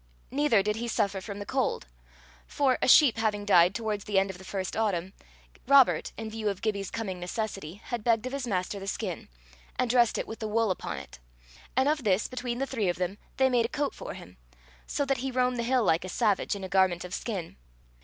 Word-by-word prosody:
Neither 270 Hz, -7 st, +3 dB
did 210 Hz, +1 st, -1 dB
he 235 Hz, +1 st, -3 dB
suffer 200 Hz, -4 st, 0 dB
from 200 Hz, 0 st, -7 dB
the 205 Hz, -, -6 dB
cold; 265 Hz, -, -1 dB, 0.6 s
for, 270 Hz, -3 st, +1 dB
a -, -, +2 dB
sheep 260 Hz, -2 st, +7 dB
having 210 Hz, -2 st, 0 dB
died 180 Hz, -1 st, +5 dB
towards 215 Hz, -3 st, -2 dB
the 205 Hz, -2 st, 0 dB
end 195 Hz, 0 st, +3 dB
of 180 Hz, -, -13 dB
the -, -, -11 dB
first 190 Hz, 0 st, -4 dB
autumn, 190 Hz, -4 st, -1 dB, 0.5 s
Robert, 275 Hz, -1 st, +5 dB
in 225 Hz, -, -5 dB
view 220 Hz, -1 st, -2 dB
of 195 Hz, -2 st, -5 dB
Gibbie's 200 Hz, -3 st, -1 dB
coming 195 Hz, -5 st, -4 dB
necessity, 185 Hz, -2 st, -4 dB
had 225 Hz, +2 st, -6 dB
begged 230 Hz, 0 st, +2 dB
of 255 Hz, -, -4 dB
his 275 Hz, -3 st, -3 dB
master 195 Hz, -1 st, -2 dB
the 195 Hz, -, -8 dB
skin, 195 Hz, -3 st, -4 dB, 0.5 s
and 250 Hz, -2 st, +1 dB
dressed 240 Hz, -2 st, +4 dB
it -, -, -2 dB
with 220 Hz, -, -8 dB
the 220 Hz, -, -3 dB
wool 220 Hz, -1 st, +1 dB
upon 85 Hz, -, -4 dB
it; 70 Hz, -3 st, -10 dB, 0.6 s
and 260 Hz, +1 st, +4 dB
of 300 Hz, -2 st, +1 dB
this, 200 Hz, -1 st, +2 dB
between 245 Hz, -1 st, -4 dB
the 270 Hz, -, 0 dB
three 225 Hz, -9 st, -1 dB
of 175 Hz, -, -1 dB
them, 185 Hz, +3 st, -3 dB, 0.2 s
they 265 Hz, -, +4 dB
made 240 Hz, -3 st, +2 dB
a -, -, -29 dB
coat 290 Hz, 0 st, -1 dB
for -, -, -7 dB
him; 90 Hz, +2 st, -12 dB, 0.5 s
so 285 Hz, -, -1 dB
that 275 Hz, -1 st, +1 dB
he 265 Hz, +2 st, -2 dB
roamed 250 Hz, -1 st, +1 dB
the -, -, 0 dB
hill 250 Hz, +1 st, +2 dB
like 165 Hz, -4 st, +2 dB
a 185 Hz, -, -6 dB
savage, 210 Hz, 0 st, +1 dB
in 200 Hz, -, -7 dB
a -, -, -3 dB
garment 185 Hz, -2 st, +2 dB
of 180 Hz, -, -8 dB
skin. 190 Hz, -7 st, -4 dB
215 Hz, 230 wpm, -28 LUFS, 190-245 Hz, 0.6 s, sheep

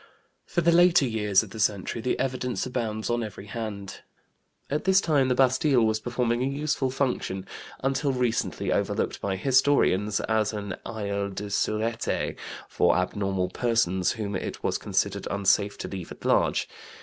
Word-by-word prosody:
For 175 Hz, -, 0 dB
the 170 Hz, +1 st, +4 dB
later 175 Hz, -3 st, +5 dB
years 105 Hz, -4 st, +2 dB
of 105 Hz, -, -11 dB
the 110 Hz, -, -8 dB
century 100 Hz, +2 st, 0 dB
the 125 Hz, -, 0 dB
evidence 130 Hz, -1 st, -1 dB
abounds 115 Hz, -4 st, -3 dB
on 120 Hz, 0 st, 0 dB
every 105 Hz, -3 st, -7 dB
hand. 105 Hz, -3 st, -6 dB, 0.7 s
At 150 Hz, +2 st, -2 dB
this 190 Hz, 0 st, +5 dB
time 150 Hz, -8 st, +2 dB
the 125 Hz, -, +2 dB
Bastille 130 Hz, 0 st, +3 dB
was 110 Hz, 0 st, +1 dB
performing 120 Hz, 0 st, -1 dB
a 130 Hz, -, +1 dB
useful 140 Hz, -1 st, -1 dB
function, 125 Hz, -8 st, -2 dB, 0.4 s
until 135 Hz, +1 st, +1 dB
recently 125 Hz, -3 st, -1 dB
overlooked -, -, -1 dB
by 100 Hz, -1 st, -1 dB
historians, 105 Hz, -4 st, +3 dB
as 110 Hz, -1 st, 0 dB
an 100 Hz, -3 st, -4 dB
asile 100 Hz, -3 st, -3 dB
de 105 Hz, 0 st, -5 dB
sureté 110 Hz, +3 st, -1 dB, 0.3 s
for -, -, +2 dB
abnormal 95 Hz, 0 st, -1 dB
persons 95 Hz, -5 st, +1 dB
whom 105 Hz, -3 st, -4 dB
it -, -, -5 dB
was -, -, 0 dB
considered -, -, -1 dB
unsafe 100 Hz, 0 st, +2 dB
to -, -, -5 dB
leave 95 Hz, -4 st, -7 dB
at -, -, -11 dB
large. -, -, +2 dB
115 Hz, 160 wpm, -26 LUFS, 100-130 Hz, 0.7 s, later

